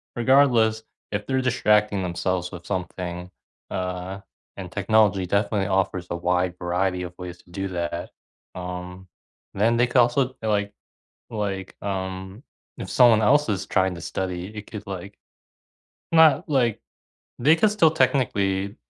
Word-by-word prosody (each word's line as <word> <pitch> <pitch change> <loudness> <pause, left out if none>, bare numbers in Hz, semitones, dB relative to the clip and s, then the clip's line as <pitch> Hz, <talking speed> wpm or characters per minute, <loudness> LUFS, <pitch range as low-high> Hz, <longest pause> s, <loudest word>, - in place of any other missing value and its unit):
regardless, 120 -3 +4 0.3
if 100 0 -3
they're 130 -1 +1
distracting 105 -5 +2
themselves 90 0 -2
with 90 -2 -9
something, 90 -2 -4 0.4
uh, 90 +1 -4 0.4
and 90 -3 -7
technology 100 -2 +2
definitely 100 0 0
offers 95 -2 0
a - - -2
wide 90 0 0
variety 90 +1 -1
of 90 -1 -7
ways 90 -1 -7
to 85 - -22
do 95 +2 -3
that, 85 -1 -4 0.5
um, 90 +1 -7 0.5
then 115 +4 +2
they 120 +1 +3
could 125 - -1
also 120 +3 +4
d - - -20
like 100 -1 0 0.6
like, 100 -4 -4
um, 95 +1 -5 0.4
if - - -6
someone 120 -3 +6
else 145 +7 +4
is 100 -2 -1
trying 95 -1 +1
to - - -8
study, 90 +1 -4
it 105 -1 -8
could, 105 -1 -8
like 95 +1 -7 0.9
not, 160 -4 +5
like 125 -6 +1 0.6
they 155 +3 +5
can 190 +6 +3
still 200 -7 +4
technically, 100 -10 +1
95 Hz, 145 wpm, -24 LUFS, 90-110 Hz, 0.9 s, someone